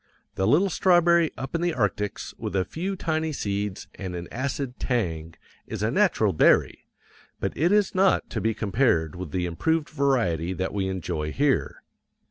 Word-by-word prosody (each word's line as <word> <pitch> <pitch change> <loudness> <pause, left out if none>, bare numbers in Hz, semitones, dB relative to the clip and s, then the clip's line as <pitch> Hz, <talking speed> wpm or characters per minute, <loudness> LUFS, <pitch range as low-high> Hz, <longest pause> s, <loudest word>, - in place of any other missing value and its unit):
The 95 - 0
little 180 - +3
strawberry 170 -2 +4
up 135 - -6
in 165 - -1
the 175 -1 +1
arctics 105 -2 -2
with - - -4
a 95 -1 +1
few 190 +4 -4
tiny 160 -3 -1
seeds 100 -6 -3
and 95 -3 -6
an 85 0 -6
acid 130 0 -3
tang 85 -10 -2 0.3
is - - -4
a 110 - +1
natural 140 - +2
berry, 80 - +3 0.5
but - - -3
it 170 +6 +2
is 205 -2 +3
not 190 +1 +3
to - - -2
be 110 -1 0
compared 100 - +1
with 90 -2 -6
the 90 +3 -1
improved 150 - 0
variety 115 - 0
that 95 +1 -3
we 100 -2 -1
enjoy 80 -5 -3
here. 140 - 0
115 Hz, 170 wpm, -25 LUFS, -, 0.5 s, strawberry